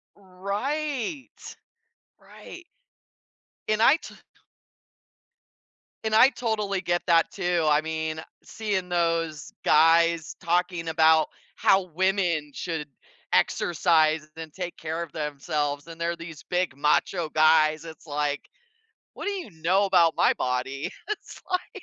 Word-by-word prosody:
Right. 250 - -4 0.6
Right. 355 - -13 1.0
And 215 0 +1
I 270 - +7
to - - -12 1.9
and 220 0 0
I 255 +4 +8
totally 215 -6 -2
get 175 -1 -1
that 165 -1 +4
too, 175 -4 0
I 150 0 +4
mean, 160 0 -3 0.2
seeing 205 -5 -3
those 165 -3 -1
guys 165 +1 +4
talking 175 0 0
about 160 -1 +4 0.3
how 195 0 +3
women 180 -4 0
should 160 -1 -4 0.5
exercise 160 -3 +2
then 160 -1 -8
take 175 +2 -6
care 160 +2 -4
of 170 -3 -6
themselves 145 0 -3
and 165 0 -10
they're 170 0 0
these 165 -3 -10
big, 180 -6 0
macho 150 +3 +1
guys, 155 0 +3
it's, 160 0 -11
like, 145 0 -1 0.7
"What - - -7
do 410 - 0
you 370 - -6
know 190 +4 +3
about 175 -4 +4
my - - +4
body?" 130 +3 -2 0.2
It's 425 - -6
like 370 +2 -3
170 Hz, 120 wpm, -26 LUFS, 155-195 Hz, 1.9 s, I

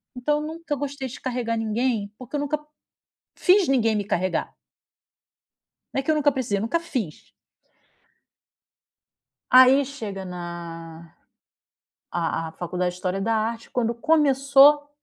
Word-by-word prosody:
então 295 +4 0
nunca 320 0 -4
gostei 280 -1 -4
de 255 - -9
carregar 240 -3 -2
ninguém, 220 -1 -1
porque 255 +3 -8
eu - - 0
nunca 290 +1 -1 0.8
fiz 380 0 +4
ninguém 230 -5 +2
me 205 - 0
carregar. 185 -3 -1 1.4
Não - - 0
é - - -2
que 315 - +1
eu - - +2
nunca 295 -1 +3
precisei, 250 -6 -1
eu - - -2
nunca 230 +10 0
fiz. 255 - -5 2.2
Aí 260 +2 +7
chega 220 -8 -6
na 170 -2 -8 1.0
a 165 -1 -2
a - - -13
faculdade 180 +2 -2
de - - -11
história 185 +1 -2
da 225 +3 0
arte 225 +1 -2
quando 235 -1 0
começou, 285 0 +4
240 Hz, 135 wpm, -24 LUFS, 195-280 Hz, 2.2 s, Aí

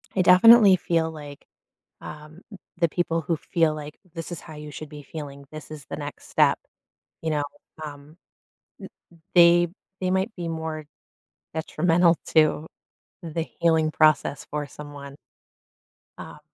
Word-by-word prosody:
I 190 - +3
definitely 195 +3 +8
feel 165 -2 0
like, 145 -3 -11 0.6
um, 155 +3 -11 0.4
the 170 -1 +2
people 165 0 -1
who 165 +2 -1
feel 160 0 +1
like 150 0 -9
"this 165 +1 -7
is 175 - -5
how 155 - -11
you 150 0 -9
should 150 +2 -8
be 150 -1 -10
feeling, 140 -2 -9
this 155 -1 -9
is 150 -2 -9
the - - -7
next 145 -1 -8
step," - - +3 0.6
you 160 - -2
know, 150 -1 0 0.4
um 145 +2 -11 1.0
m - - -26
they 175 0 +6 0.3
they 185 -1 0
might 190 +4 0
be 175 -2 -4
more 160 -2 -5 0.7
detrimental 165 +2 +2 0.2
to 155 0 +3 0.6
the 165 -1 -3 0.2
healing 160 -2 +3
process 155 -2 +2
for 150 -1 -3
someone. 145 -1 -10 1.0
Um - - -10
160 Hz, 140 wpm, -25 LUFS, 150-170 Hz, 1.0 s, definitely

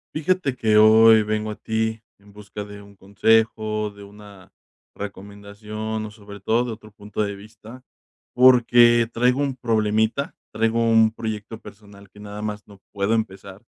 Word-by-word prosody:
Fíjate 155 -4 -1
que 110 -4 +2
hoy 110 +1 +6
vengo 110 0 -3
a 105 - -5
ti, 110 0 -3 0.2
en 100 0 -20
busca 105 0 -9
de 100 0 -11
un 100 0 -18
consejo, 110 +2 0
de 100 0 -14
una 100 -2 -15 0.4
recomendación, 105 +2 -7
o 105 - -9
sobre 105 -1 -13
todo 115 +5 0
de 120 - -5
otro 110 -1 -11
punto 105 +1 -5
de 100 -1 -4
vista. 110 +4 -14 0.5
Porque 120 -2 +5
traigo 125 +3 +1
un 140 -2 -1
problemita. 110 +2 -1 0.2
Traigo 115 +1 0
un 115 -1 +3
proyecto 110 0 -6
personal, 100 -1 -15
que 105 - -18
nada 105 0 -9
más 105 0 -6
no 100 -2 -17
puedo 100 +1 -1
empezar, 100 -3 -4
110 Hz, 155 wpm, -22 LUFS, 105-115 Hz, 0.5 s, hoy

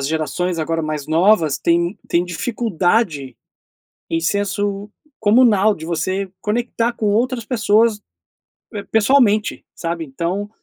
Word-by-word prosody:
as 135 - -2
gerações 160 +3 -2
agora 165 +1 -1
mais 155 -2 -4
novas 165 -3 +3
têm 170 +4 0
têm 175 +1 +1
dificuldade 175 - -1 0.7
em 165 - 0
senso 205 +2 -1 0.3
comunal, 215 -2 +4
de 160 - -9
você 185 +3 -2
conectar 235 +2 -1
com 215 - -2
outras 235 +2 0
pessoas, 220 -2 +2 0.7
eh, 205 -1 -5
pessoalmente, 220 -1 +2
sabe. 170 -1 -3
Então, 175 +9 -3
200 Hz, 120 wpm, -19 LUFS, 165-215 Hz, 0.7 s, comunal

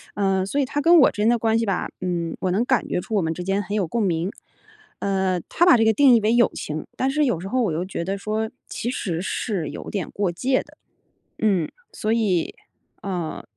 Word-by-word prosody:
呃， 195 -2 +1
所 280 +9 -1
以 275 - +2
他 290 +3 -2
跟 340 +2 +6
我 285 - +7
之 210 - -4
间 220 - +4
的 240 - +4
关 225 0 +2
系 230 - 0
吧， 195 -3 -1
嗯， 170 -2 -2
我 185 - 0
能 210 +6 +1
感 255 -2 +1
觉 - - 0
出 220 - -4
我 200 - +3
们 160 0 -1
之 180 - -7
间 195 +1 0
很 200 +3 -6
有 200 -5 0
共 225 +6 -1
鸣。 170 -1 0 0.7
呃， 190 -2 0
他 345 - +2
把 355 -8 +7
这 225 - +3
个 220 - +4
定 265 +2 +6
义 235 - +6
为 220 +2 +2
友 240 -2 +4
情， 155 +1 -5
但 265 - +1
是 300 +2 +1
有 240 - +1
时 185 - -6
候 255 +5 0
我 190 - 0
又 170 +4 -2
觉 185 -3 -4
得 195 +3 -2
说， 215 +2 -2 0.2
其 240 - -3
实 175 -9 -3
是 190 -4 -2
有 - - -7
点 200 -3 -4
过 200 -2 -1
界 255 +10 0
的。 - - -18 0.6
嗯， 195 -7 +1 0.2
所 215 - -2
以， 195 -7 0 0.5
呃， 180 -5 -4
200 Hz, 255 characters per minute, -23 LUFS, 180-235 Hz, 0.7 s, 我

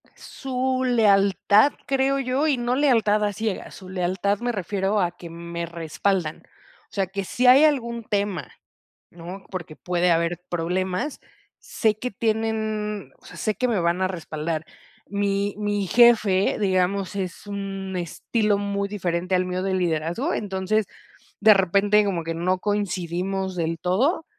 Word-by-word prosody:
Su 260 -1 -2
lealtad, 210 +1 +4
creo 270 +1 +1
yo, 270 +3 0
y 280 -4 +2
no 240 +1 0
lealtad 225 -7 +3
a 205 -1 0
ciegas, 215 -1 -4
su 185 -1 -11
lealtad 190 +2 0
me 245 0 -1
refiero 200 0 -1
a 175 -2 +1
que 175 -1 -11
me 170 0 -5
respaldan. 170 +1 -2 0.5
O - - -29
sea, 195 -2 0
que 195 +1 -4
si 250 +6 0
hay 265 +4 +8
algún 235 -6 +1
tema, 200 -4 -2 0.6
¿no? 175 +3 -9
Porque 170 -4 -6
puede 180 +1 +1
haber 170 +1 +1
problemas, 180 - -2 0.4
sé 220 -3 0
que 250 - -2
tienen, 215 -1 -2
o - - -24
sea, - - -12
sé 215 - 0
que 250 - 0
me 220 -6 +1
van 170 +2 +1
a 185 - +3
respaldar. 160 -3 -4 0.4
Mi 200 0 0
mi 205 -1 -1
jefe, 215 -4 +4
digamos, 190 0 0
es 190 0 -4
un 195 -2 -5
estilo 205 +5 0
muy 200 0 -2
diferente 180 -2 -1
al 180 0 +2
mío 180 0 -2
de 190 0 0
liderazgo, 175 - -1
entonces, 200 +1 0 0.5
de 215 +1 +8
repente, 200 +2 +3
como 185 -5 -1
que 165 0 -3
no 180 +3 0
coincidimos 190 -1 -2
del 165 -1 -1
todo, 245 - +1
195 Hz, 155 wpm, -24 LUFS, 180-215 Hz, 0.6 s, hay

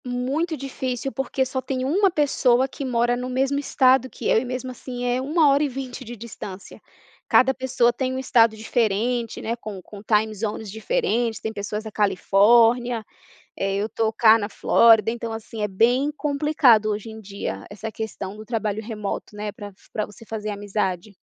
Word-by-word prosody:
Muito 270 +7 -2
difícil, 260 -1 -4
porque 270 0 -1
só 260 0 -3
tem 260 -1 -3
uma 385 +8 +3
pessoa 265 -5 +2
que 275 +2 -7
mora 240 -2 +1
no 250 +1 -4
mesmo 270 +2 0
Estado 260 -2 +3
que - - -6
eu, - - +4
e 245 - -4
mesmo 255 +1 -4
assim 245 0 -6
é 245 +1 0
1 305 +3 +3
hora 280 +2 +3
e 290 - 0
20 260 -1 -6
de 240 0 -8
distância. 205 -4 -9 0.5
Cada 265 +1 +5
pessoa 260 -2 +1
tá - - -4
em 260 0 -1
um - - -2
Estado 230 -4 +3
diferente, 230 +2 0
né, 230 - -1
com 215 -4 -8
com 200 +3 -12
time 215 0 +1
zones 210 0 -4
diferentes, 235 - -1
tem 220 - -4
pessoas 210 +1 -4
da 220 - -7
Califórnia. 225 +4 +3 0.5
Eh, 195 0 -1
eu 205 +2 0
estou 220 0 -1
cá 220 0 +6
na 205 -2 -3
Flórida, 225 +1 +5
então 230 -1 -5
assim, 225 0 -6
é 210 - 0
bem 245 +9 +2
complicado 285 -7 +3
hoje 210 +2 -4
em 220 - -9
dia 200 -1 -6
essa 220 +2 -6
questão 210 -3 -6
do 215 - -9
trabalho 220 -2 -2
remoto, 210 -2 -5
né, 210 0 -4
para 205 0 -9
f 195 - -21
pra 215 - -2
você 215 +3 -14
fazer 215 -1 -4
amizade. 200 -1 -3
230 Hz, 190 wpm, -23 LUFS, 215-260 Hz, 0.5 s, cá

